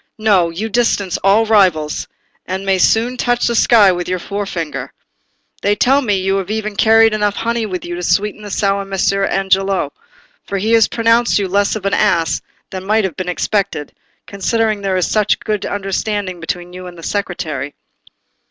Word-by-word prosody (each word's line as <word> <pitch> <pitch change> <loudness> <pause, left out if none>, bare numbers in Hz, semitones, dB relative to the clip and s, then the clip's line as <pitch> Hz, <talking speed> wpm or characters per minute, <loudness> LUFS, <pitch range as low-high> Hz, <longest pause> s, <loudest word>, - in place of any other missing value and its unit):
No! 200 -6 +3
you 185 +7 -4
distance 220 -4 0
all 200 +3 +3
rivals, 185 -9 +2 0.4
and 190 +1 -4
may 190 -1 +2
soon 235 +6 +2
touch 245 0 +1
the 235 - +1
sky 220 -3 +5
with 175 0 -3
your 185 - 0
forefinger. 170 -9 -5 0.7
They 205 +1 +2
tell 270 +7 +3
me 210 -6 0
you 195 +1 0
have 195 -1 -4
even 215 -1 -3
carried 225 +1 +5
enough 210 -1 0
honey 230 -1 -1
with 185 -3 -5
you 175 - -5
to 175 - -5
sweeten 210 +4 0
the 205 - -8
sour 200 0 0
Messer 195 0 0
Angelo; 195 -5 0 0.5
for 200 - -4
he 215 +4 -1
has 225 -2 +5
pronounced 230 +1 +2
you 200 -2 0
less 200 +3 +1
of 210 -2 -6
an 195 - 0
ass 170 -6 +1 0.3
than 185 -1 -6
might 215 +2 +1
have 185 -6 -3
been 185 -1 -4
expected, 185 -5 -2 0.3
considering 215 +1 -1
there 195 -1 0
is 180 - +1
such 215 -1 +2
a - - -19
good 210 -3 -2
understanding 195 -1 -3
between 175 +2 -5
you 180 0 -8
and 175 -1 -11
the 165 - -11
Secretary." 155 -9 -3
195 Hz, 185 wpm, -17 LUFS, 185-215 Hz, 0.7 s, sky